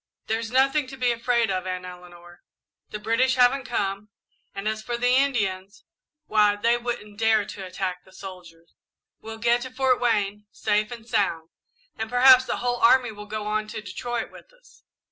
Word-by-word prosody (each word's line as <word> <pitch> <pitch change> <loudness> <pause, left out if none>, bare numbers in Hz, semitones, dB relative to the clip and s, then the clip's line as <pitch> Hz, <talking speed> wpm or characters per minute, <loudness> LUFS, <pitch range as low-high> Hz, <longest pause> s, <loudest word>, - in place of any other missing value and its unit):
"There's 225 +1 -2
nothing 270 +3 +2
to 270 +1 -10
be 250 -1 +2
afraid 235 -2 +1
of, 185 0 -2
Aunt 185 0 -4
Eleanor. 175 -1 -13 0.5
The 210 - -5
British 230 +5 +1
haven't 255 +1 +3
come, 200 -3 -3 0.5
and 195 +2 -4
as 220 0 -2
for 240 +2 -3
the 245 +1 +2
Indians, 205 -8 0 0.4
why, 210 -1 +3
they 230 +3 +2
wouldn't 235 -4 -5
dare 220 -2 +3
to 195 - -8
attack 180 0 -4
the 190 - -20
soldiers. 180 -4 -12 0.5
We'll 225 0 -8
get 235 +2 +2
to 260 - -6
Fort 255 0 +1
Wayne, 210 -3 0
safe 210 0 0
and 235 -2 -9
sound, 195 -8 0 0.5
and 220 0 -3
perhaps 255 +1 +7
the - - -2
whole 245 0 -1
army 245 0 +4
will 210 0 -10
go 215 0 -5
on 215 0 -1
to 215 0 -6
Detroit 230 +5 -4
with - - -15
us. - - -23
220 Hz, 180 wpm, -25 LUFS, 200-245 Hz, 0.5 s, perhaps